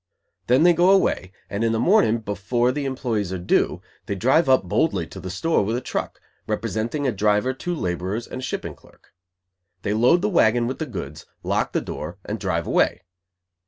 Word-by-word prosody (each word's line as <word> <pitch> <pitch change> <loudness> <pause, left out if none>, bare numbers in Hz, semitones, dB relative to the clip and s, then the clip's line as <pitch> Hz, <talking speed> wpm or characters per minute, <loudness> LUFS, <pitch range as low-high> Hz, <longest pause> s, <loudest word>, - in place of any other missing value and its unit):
Then 130 +5 +4
they 175 0 +6
go 175 +2 +4
away, 190 - +2 0.2
and, 100 +3 -3
in 115 0 +2
the 110 - 0
morning, 175 - +3
before 110 +5 0
the 140 +1 -3
employees 120 -8 -2
are 95 - -2
due, 90 - 0 0.2
they 100 - -2
drive 135 - +3
up 130 -4 +5
boldly 90 - 0
to - - -10
the 95 - -6
store 100 - +1
with 110 +4 -1
a - - 0
truck; - - -4 0.3
representing 120 +7 -2
a 130 - +2
driver, 105 +4 +1
two 175 +6 -4
laborers, 95 - -3
and - - -7
a - - -8
shipping 130 - -4
clerk. - - -23 0.7
They 100 - 0
load 125 - +4
the - - +3
wagon 120 - +3
with 130 +3 -4
the 160 - -3
goods, 75 - -7 0.2
lock - - 0
the - - +1
door, 80 +3 -6
and 105 +1 -4
drive 85 -4 -1
away. - - +1
115 Hz, 195 wpm, -23 LUFS, 100-135 Hz, 0.7 s, they